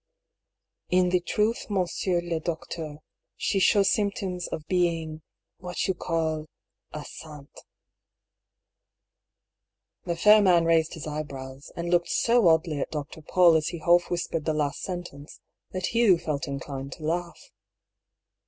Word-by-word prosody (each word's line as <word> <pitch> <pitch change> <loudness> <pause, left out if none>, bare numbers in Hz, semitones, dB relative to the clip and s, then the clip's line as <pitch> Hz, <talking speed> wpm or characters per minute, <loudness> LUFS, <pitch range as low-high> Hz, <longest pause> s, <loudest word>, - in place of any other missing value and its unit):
In 180 0 +3
the 180 0 +3
truth, 210 +6 -1
mon 190 -3 +1
sieur 175 +1 -1
le 170 -2 -2
docteur, 160 -2 -5 0.3
she 195 - 0
shows 195 +1 +4
symptoms 195 -4 -2
of 155 - -6
being, 165 -3 0 0.4
what 180 -1 -3
you 190 - +2
call, 160 -3 -2 0.4
a 150 -1 -7
sainte.^^ 150 -3 -11 2.5
The 170 - -1
fair 210 +5 +6
man 175 -4 +4
raised 165 0 +2
his 160 - -7
eyebrows, 140 -3 -6
and 170 0 -3
looked 175 -1 +2
so 230 +4 +3
oddly 160 -2 +3
at - - -2
Dr. 150 0 -6
Paull 170 +1 +5
as 155 0 +1
he 170 - -3
half 175 +2 +3
whispered 165 -3 -2
the 155 - 0
last 145 -2 -1
sen 180 -2 -4
tence, 145 -3 -12 0.3
that 185 +2 -3
Hugh 230 -6 +5
felt 150 -4 -3
inclined 140 -1 -5
to 155 - -12
laugh. 170 +2 -3
170 Hz, 145 wpm, -26 LUFS, 155-180 Hz, 2.5 s, fair